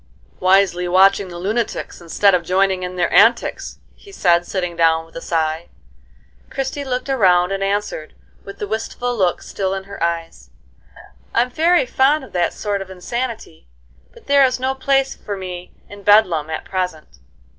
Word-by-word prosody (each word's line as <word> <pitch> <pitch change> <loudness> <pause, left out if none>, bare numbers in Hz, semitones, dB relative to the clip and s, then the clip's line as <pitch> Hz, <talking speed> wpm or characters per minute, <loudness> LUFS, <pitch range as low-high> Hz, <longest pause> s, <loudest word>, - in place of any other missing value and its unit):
"Wisely 185 -1 +3
watching 195 +2 +4
the 175 -1 -9
lunatics, 210 +2 -3
instead 190 +4 +2
of 180 - +3
joining 185 +2 +1
in 180 0 -5
their 175 -1 0
antics," - - +3 0.2
he 400 - -17
said, 175 - +2
sitting 180 -3 -3
down 165 -1 +2
with 165 - -22
a 165 - -6
sigh. 160 0 -2 0.8
Christie 270 +1 -3
looked 255 -1 -3
around 185 -9 +3
and 195 0 -2
answered, 195 -6 -3 0.3
with 200 0 -10
the 205 - -4
wistful 225 +3 -3
look 185 -5 0
still 195 -1 -3
in 195 - -5
her 200 -1 -11
eyes: 165 - -3 0.9
"I'm 245 +2 +2
very 335 +3 +3
fond 270 +4 +2
of 250 - -13
that 175 -2 +1
sort 205 -2 -3
of 190 - -8
insanity; 225 - -5 0.4
but - - -18
there 280 0 +5
is 255 -1 +1
no 260 +1 0
place 270 0 +1
for 205 -1 -7
me 180 -1 -7 0.2
in 205 0 -12
Bedlam 185 -7 +4
at 160 - -5
present." 180 -5 -4
195 Hz, 165 wpm, -19 LUFS, 175-235 Hz, 0.9 s, there